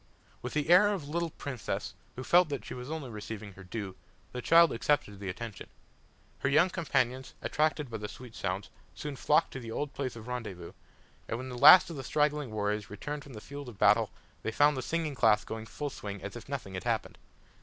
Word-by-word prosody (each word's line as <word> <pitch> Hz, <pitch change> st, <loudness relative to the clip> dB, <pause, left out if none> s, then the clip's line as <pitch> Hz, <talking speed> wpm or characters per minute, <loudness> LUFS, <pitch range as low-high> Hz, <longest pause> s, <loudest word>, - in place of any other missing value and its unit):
With 125 Hz, -, -5 dB
the 150 Hz, +2 st, +1 dB
air 185 Hz, +4 st, +8 dB
of 200 Hz, -6 st, -1 dB
a -, -, -8 dB
little 170 Hz, +1 st, 0 dB
princess, 140 Hz, -6 st, -4 dB, 0.2 s
who 130 Hz, -, -5 dB
felt 175 Hz, +3 st, +5 dB
that 140 Hz, -7 st, -4 dB
she -, -, -6 dB
was 125 Hz, +1 st, -7 dB
only 155 Hz, -6 st, -5 dB
receiving 105 Hz, -1 st, -7 dB
her 95 Hz, -, -12 dB
due, 95 Hz, 0 st, -5 dB, 0.4 s
the 125 Hz, -, -5 dB
child 165 Hz, +5 st, +6 dB
accepted 115 Hz, -5 st, 0 dB
the 100 Hz, -1 st, -4 dB
attention. 110 Hz, +3 st, -7 dB, 0.7 s
Her 130 Hz, -, +1 dB
young 160 Hz, +6 st, +4 dB
companions, 130 Hz, -7 st, -1 dB
attracted 150 Hz, -3 st, 0 dB
by 110 Hz, -, -3 dB
the 105 Hz, -1 st, -5 dB
sweet 120 Hz, +1 st, -11 dB
sounds, 95 Hz, -1 st, -3 dB, 0.2 s
soon 150 Hz, -2 st, -5 dB
flocked 150 Hz, +3 st, +2 dB
to 135 Hz, -, -5 dB
the 115 Hz, -3 st, -8 dB
old 145 Hz, +5 st, -3 dB
place 130 Hz, -4 st, -3 dB
of 115 Hz, 0 st, -10 dB
rendezvous, 105 Hz, -9 st, -5 dB, 0.6 s
and 115 Hz, -, -2 dB
when 130 Hz, +2 st, -6 dB
the 125 Hz, -, -6 dB
last 155 Hz, +8 st, +9 dB
of 160 Hz, -, -6 dB
the 135 Hz, -, -5 dB
straggling 150 Hz, 0 st, +1 dB
warriors 105 Hz, -1 st, -2 dB
returned 145 Hz, +8 st, -5 dB
from 140 Hz, -, -12 dB
the 110 Hz, -, -7 dB
field 140 Hz, 0 st, -8 dB
of 110 Hz, -, -12 dB
battle -, -, +5 dB, 0.3 s
they 110 Hz, -, -2 dB
found 145 Hz, +6 st, +4 dB
the 130 Hz, -, -2 dB
singing 160 Hz, +2 st, -1 dB
class 105 Hz, -5 st, +4 dB
going 110 Hz, 0 st, -6 dB
full 145 Hz, +3 st, -4 dB
swing 100 Hz, -4 st, -6 dB
as 100 Hz, -, -6 dB
if 120 Hz, +2 st, -9 dB
nothing 130 Hz, -9 st, -5 dB
had 95 Hz, -, -4 dB
happened. -, -, -1 dB
125 Hz, 220 wpm, -30 LUFS, 110-150 Hz, 0.7 s, last